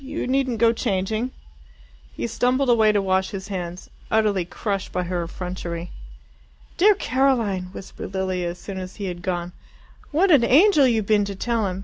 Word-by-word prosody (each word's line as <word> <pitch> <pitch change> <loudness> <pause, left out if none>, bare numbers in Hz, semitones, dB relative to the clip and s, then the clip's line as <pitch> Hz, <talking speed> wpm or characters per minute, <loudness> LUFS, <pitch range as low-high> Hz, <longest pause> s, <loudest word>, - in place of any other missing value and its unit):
You 285 +4 -4
needn't 260 -2 0
go 230 +1 +4
changing." 220 +1 -1 0.8
He 115 - -4
stumbled 250 - +1
away 220 -2 +5
to 205 - +2
wash 190 0 +1
his 195 0 -7
hands, 180 -2 -5 0.2
utterly 210 -5 +2
crushed 195 +1 -3
by 180 - -1
her 175 0 -2
effrontery. 175 -1 -6 0.8
"Dear 410 +3 +5
Caroline!" 240 - +1
whispered 190 0 -8
Lilia 185 -2 -1
as 175 - -7
soon 190 +1 -7
as 185 0 -7
he 205 - -5
had 175 -2 -5
gone. 175 -1 -3 0.6
"What 355 +6 +3
an 280 -7 +6
angel 295 - +5
you've 225 -4 +1
been 205 -1 +3
to 200 0 -5
tell 230 +1 0
him! 185 0 -4
200 Hz, 170 wpm, -23 LUFS, 185-245 Hz, 0.8 s, an